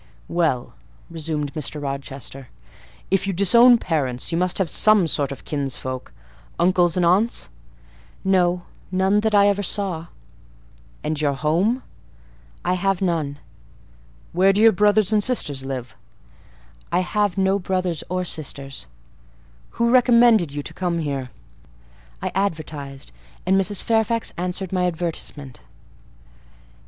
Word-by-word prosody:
"Well," 160 -8 0 0.4
resumed 155 -3 -3
Mr. 155 -1 -3
Rochester, 135 -1 -6 0.6
"if 195 0 +1
you 195 - 0
disown 235 +7 +6
parents, 135 - -2
you - - 0
must 180 0 +1
have 190 - +1
some 215 +3 +4
sort 145 -3 -1
of 140 - -9
kinsfolk: 130 -3 -4 0.5
uncles 175 -1 +3
and 180 - +3
aunts?" 200 +7 +1 0.7
"No; 180 -2 +2 0.3
none 190 +2 +2
that 215 0 +1
I 200 0 +6
ever 205 0 +2
saw." 185 -4 -2 1.0
"And 155 -1 -2
your 145 -2 +2
home?" 170 - +1 0.8
"I 180 - +2
have 195 +1 0
none." 160 -6 -1 1.0
"Where 190 +3 +5
do 200 - 0
your 225 +1 +7
brothers 210 +1 +3
and 210 -1 +3
sisters 145 - -1
live?" 130 -2 -5 1.0
"I - - +2
have 200 +1 0
no 195 +1 +2
brothers 185 -3 -2
or 185 0 -1
sisters." 140 - -5 0.9
"Who 235 0 +2
recommended 235 - +5
you 145 0 -4
to - - -6
come 175 -2 -1
here?" 140 -5 -3 0.9
"I - - -1
advertised, 155 - -3 0.3
and 190 +1 +3
Mrs. 195 0 +1
Fairfax 225 0 0
answered 180 +1 -4
my 180 -1 +2
advertisement." 160 -6 -5
180 Hz, 125 wpm, -22 LUFS, 150-200 Hz, 1.0 s, your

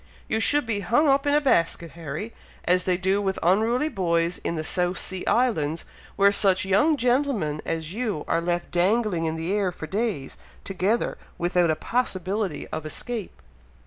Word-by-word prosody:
You 220 - 0
should 290 +5 +4
be 225 -3 -1
hung 240 +9 +2
up 275 +1 +3
in 285 - +3
a - - +5
basket, 170 - +1
Harry, 165 +7 -6 0.3
as 180 +1 +2
they 180 -1 +2
do 190 +2 +1
with 190 -1 -1
unruly 225 - +2
boys 170 - 0
in 170 - -2
the 155 - -3
South 180 +2 0
Sea 185 -1 -3
Islands, 165 -11 +1 0.3
where 200 0 +5
such 195 -2 +3
young 210 +12 +3
gentlemen 245 - 0
as 165 0 -3
you 215 -9 -3
are 165 - +1
left 175 0 -2
dangling 185 -1 +1
in 160 0 -1
the 165 +4 -2
air 200 -3 +1
for 160 - -8
days 195 - -3 0.2
together 195 +4 -1 0.2
without 175 0 +1
a 155 - +2
possibility 195 -4 -1
of 155 - -4
escape!" 200 - -5
190 Hz, 175 wpm, -25 LUFS, 170-230 Hz, 0.3 s, a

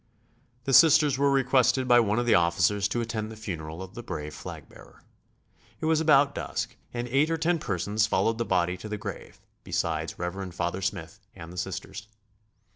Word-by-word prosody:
The 135 - -2
Sisters 150 -3 +6
were 140 0 +3
requested 130 -1 +2
by 120 -1 +6
one 110 -2 +1
of 120 - +1
the 120 - +4
officers 90 +4 +2
to 120 - -2
attend 110 -1 -4
the - - -8
funeral 85 -5 -6
of 95 0 -11
the 120 - -7
brave 75 -8 -6
flag - - -9
bearer. - - -17 0.8
It - - -4
was 160 0 +2
about 145 -3 +4
dusk - - -4 0.2
and 120 0 -4
eight 140 +5 +2
or 165 - 0
ten 165 +1 +1
persons 100 - 0
followed 115 +1 +1
the - - +1
body 90 -2 0
to 105 - -9
the 105 - -3
grave, - - -8 0.2
besides - - -2
Rev. 90 +1 -5
Father 90 +2 -2
Smith 95 -1 -4 0.2
and 85 -2 -10
the - - -11
Sisters. 95 +2 -5
110 Hz, 190 wpm, -27 LUFS, 90-130 Hz, 0.8 s, Sisters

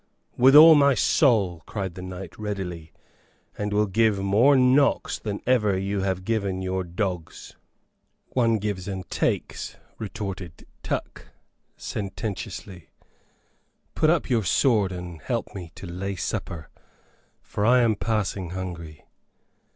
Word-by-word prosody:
'" - - -47
"With 130 +3 +6
all 160 +2 +11
my 140 -2 +5
soul," 105 - +2
cried 95 -4 -4
the 90 - -9
knight, 95 -1 -8
readily. 95 -6 -5 0.6
"And 105 0 -3
will 105 +1 +2
give 110 +1 +2
more 105 +9 +4
knocks 130 +2 +3
than 105 -2 -4
ever 105 -6 +2
you 100 +1 -2
have 95 -1 -2
given 100 -4 -1
your 95 0 -2
dogs." 90 -1 -5 0.7
"One 115 -3 +2
gives 100 -3 -4
and 95 -2 -5
takes," - - -2 0.2
retorted 95 -5 -6 0.2
Tuck, - - -5 0.5
sententiously; 95 -3 -6 1.0
"put 155 - +2
up 165 -2 +2
your 115 -4 +1
sword 105 0 +2
and 90 -3 -7
help - - -3
me 90 -4 -8
to - - -9
lay 95 +3 -4
supper, 80 -2 -4 0.7
for 105 - -4
I 125 +3 +5
am 115 -2 +3
passing 100 -4 -2
hungry." 85 -4 -7
100 Hz, 130 wpm, -25 LUFS, 90-115 Hz, 1.0 s, all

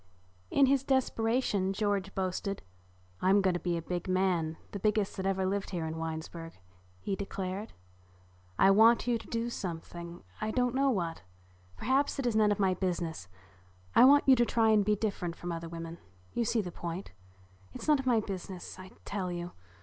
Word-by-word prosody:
In 280 - +5
his 270 0 +3
desperation 225 -6 +1
George 200 -1 -1
boasted, 190 +1 -2 0.6
"I'm 195 +2 +5
going 190 -2 +2
to 175 - -1
be 175 -1 -1
a 165 - -5
big 175 +2 -3
man, 180 -4 +1
the 200 - -5
biggest 210 0 +1
that 190 -1 -2
ever 190 -1 +1
lived 195 +1 -1
here 175 -4 -3
in 160 0 -4
Winesburg," 165 +1 -5 0.5
he 195 - -2
declared. 195 +1 -5 0.8
"I 195 - +6
want 225 +4 +6
you 240 -2 +1
to - - -12
do 230 +1 -2
something, 170 -2 -6 0.2
I 215 - -1
don't 250 +2 +1
know 275 +1 +3
what. 170 -9 -1 0.6
Perhaps 275 +3 +1
it 275 - -2
is 240 -3 +1
none 215 -1 +4
of 205 - +1
my 190 -2 +2
business. 175 - -3 0.7
I - - +8
want 285 +2 +7
you 265 - +8
to 240 - +5
try 225 -2 +3
to 210 - +5
be 210 +1 +2
different 195 -5 -2
from 175 0 -5
other 165 0 -5
women. 165 0 -7 0.3
You 235 - 0
see 230 0 +1
the 180 - -6
point. 170 +3 -6 0.6
It's - - -8
none 300 -2 +5
of 265 - -4
my 235 -3 +4
business 190 -3 -7
I 185 0 -9 0.2
tell 190 -3 -3
you. 175 0 -5
195 Hz, 190 wpm, -31 LUFS, 175-225 Hz, 0.8 s, I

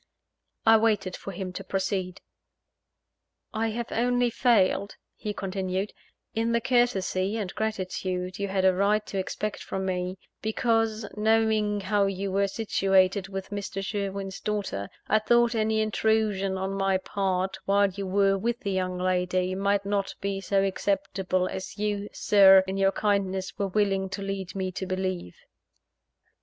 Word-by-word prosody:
I 225 0 +8
waited 210 -4 +1
for - - -8
him 185 0 -5
to 195 - -6
proceed. 190 -1 -2 1.3
"I 225 0 0
have 235 +1 -4
only 245 +1 +2
failed," 215 -4 +2 0.2
he 210 - -4
continued, 190 0 -3 0.4
"in 230 +1 0
the 235 - +3
courtesy 225 -5 +1
and 200 -5 -4
gratitude 185 -3 -3
you 200 - -1
had 190 -1 0
a 190 - +6
right 205 +3 +2
to 195 - -3
expect 210 +2 -3
from 190 0 -4
me, 185 0 -2 0.2
because, 225 -1 0
knowing 215 -1 +2
how 200 +1 +2
you 195 0 -3
were 200 +1 +2
situated 195 -2 +2
with 195 0 -6
Mr. 200 -1 -4
Sherwin's 195 -2 -3
daughter, 200 - -3 0.2
I 215 - +4
thought 235 +2 +3
any 220 -1 +1
intrusion 215 -3 +1
on 190 +1 -2
my 195 -1 +1
part, 190 -1 -2
while 200 0 +3
you 195 +1 -5
were 195 +1 +3
with 235 +4 -1
the 200 - -2
young 185 -1 -1
lady, 185 0 0
might 200 +1 +1
not 200 -1 -1
be 195 -1 -2
so 195 0 +1
acceptable 190 -1 0
as 190 +1 -6
you, 205 0 -2
Sir, 195 -2 +6
in 190 0 -3
your 195 0 +3
kindness, 195 -2 -1
were 200 - +1
willing 195 -1 +1
to 195 +1 -5
lead 195 -1 -4
me 190 -1 -2
to 190 +1 -5
believe." 185 - -3
195 Hz, 150 wpm, -27 LUFS, 190-210 Hz, 1.3 s, I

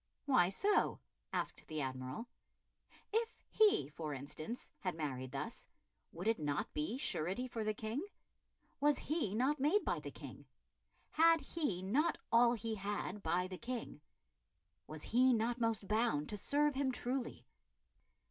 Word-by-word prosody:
"Why 255 -11 +5
so?" 405 - +2 0.3
asked - - -3
the 155 -1 -3
Admiral. 130 - -4 0.9
If 455 +1 +1 0.2
he, 420 - +5
for 155 -1 -4
instance, 150 - -6
had 185 -3 -2
married 130 -5 -3
thus, - - -5 0.4
would 180 +5 -5
it 225 -4 +3
not 145 -1 -1
be 155 +11 -1
surety 195 - 0
for 230 -3 -3
the 215 0 0
King? 220 +8 -3 0.8
Was 295 +1 +4
he 295 - -1
not 265 +6 +2
made 310 +10 +3
by - - 0
the - - -6
King? - - -10 0.6
Had 330 +1 +6
he 275 - -2
not 265 - +2
all 235 +1 +6
he 225 -1 -2
had 205 0 -3
by 175 +2 +1
the 185 -1 -7
King? 235 -9 -5 0.9
Was 155 0 -7
he 255 +2 +4
not 235 +2 0
most 225 -3 +1
bound 215 -9 +1
to - - -1
serve 290 +7 +2
him 265 0 +1
truly? 250 0 -3
225 Hz, 145 wpm, -37 LUFS, 170-265 Hz, 0.9 s, Had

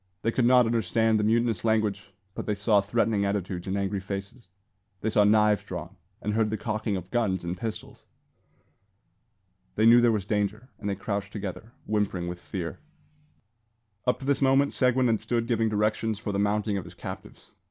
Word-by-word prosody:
They 115 - +2
could 120 +1 +1
not 125 0 +6
understand 115 0 +2
the - - +1
mutinous 115 -2 +1
language, 110 -3 0 0.2
but - - -6
they 105 - 0
saw 105 0 +3
threatening 105 0 +1
attitudes 95 -3 -2
and 95 +1 -1
angry 100 0 -1
faces. 100 +3 -7 0.5
They 110 - -1
saw 105 -1 +4
knives 105 0 +4
drawn, - - -7 0.3
and 105 - -1
heard 110 0 +2
the 110 - -2
cocking 110 -1 -2
of 90 0 -9
guns 100 -7 0
and 85 +1 -2
pistols. 110 +4 -7 1.7
They 110 - +3
knew 120 +1 +8
there 120 -1 +4
was 105 -4 -1
danger, 105 +4 -2
and 105 -1 -3
they 100 - -1
crouched 100 0 -3
together, 105 +3 -6
whimpering 100 -5 -1
with 90 0 -5
fear. 85 -3 -5 1.3
Up 125 - +3
to - - -6
this 140 0 +1
moment 135 +1 +3
Seguin 125 0 +3
had 115 -3 +2
stood 115 -1 -1
giving 115 -2 +1
directions 110 +1 0
for 105 0 -4
the 100 - -1
mounting 105 0 +1
of 90 - -8
his - - -12
captives. - - -9
105 Hz, 185 wpm, -27 LUFS, 100-115 Hz, 1.7 s, knew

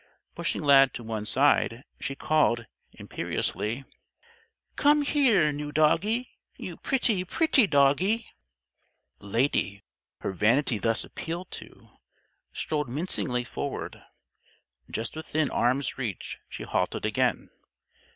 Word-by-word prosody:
Pushing - - -2
Lad 135 -2 +6
to 120 - -6
one 110 -2 -4
side, 130 -2 +2 0.2
she 135 - -3
called, 135 -7 +2 0.3
imperiously: 120 +6 -3 0.9
"Come 295 0 +4
here, 235 - +4
new 145 0 -5
Doggie. 205 +11 +2 0.3
You - - -6
pretty, 230 -8 +1
pretty 265 - +3
Doggie!" 165 +10 +3 0.9
Lady, 100 -1 0 0.4
her - - -2
vanity 115 +5 +2
thus 115 +3 +1
appealed 170 +3 -6
to, - - -11 0.6
strolled 150 -4 -2
mincingly 125 -4 -1
forward. 120 - -5 0.9
Just 115 +5 -4
within 155 -2 -1
arm's 130 +2 0
reach, 115 -8 -4
she - - -7
halted - - -1
again. - - 0
145 Hz, 105 wpm, -27 LUFS, 120-180 Hz, 0.9 s, Lad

